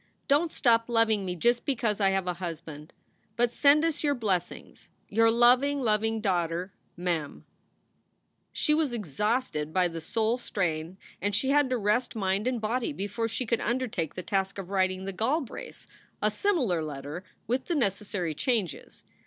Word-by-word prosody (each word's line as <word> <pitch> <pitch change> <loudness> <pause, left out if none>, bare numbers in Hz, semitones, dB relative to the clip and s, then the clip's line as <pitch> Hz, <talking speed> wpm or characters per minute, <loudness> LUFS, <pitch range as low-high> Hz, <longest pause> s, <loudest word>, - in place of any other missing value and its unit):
Dont 300 +4 +3
stop 230 -2 +3
loveing 225 -4 +3
me 180 -1 -2
just 240 +7 +2
because 230 -6 0
I 195 - +4
have 195 -1 0
a 180 - -1
husband. 160 -3 -7 0.4
But 240 0 +1
send 295 +4 +5
us 325 -2 -1
your 290 -1 +2
blessings. 190 -7 -3 0.2
Your 225 +2 +4
loveing, 250 +5 +4
loveing 220 -2 +1
daughter 175 -1 -1 0.2
MEM. 170 -4 -3 1.1
She 300 - +2
was 305 -5 +1
exhausted 210 - -1
by 180 +1 +3
the 165 -1 -6
soul 225 +7 0
strain 170 -5 -2 0.2
and 205 0 0
she 265 +6 +1
had 290 -2 +4
to 255 - +1
rest 215 +4 0
mind 195 +1 0
and 255 -2 0
body 230 +5 -1
before 225 -1 -2
she 225 +3 -3
could 235 0 0
undertake 230 - -2
the 185 - -5
task 195 0 -1
of 195 -1 -7
writing 185 -1 0
the 195 - -4
Galbraiths 255 - -3 0.3
a - - +1
similar 255 - +1
letter 145 +3 -6 0.2
with 250 +4 -1
the 345 - 0
necessary 200 - -1
changes. 195 - -2
215 Hz, 160 wpm, -28 LUFS, 180-245 Hz, 1.1 s, send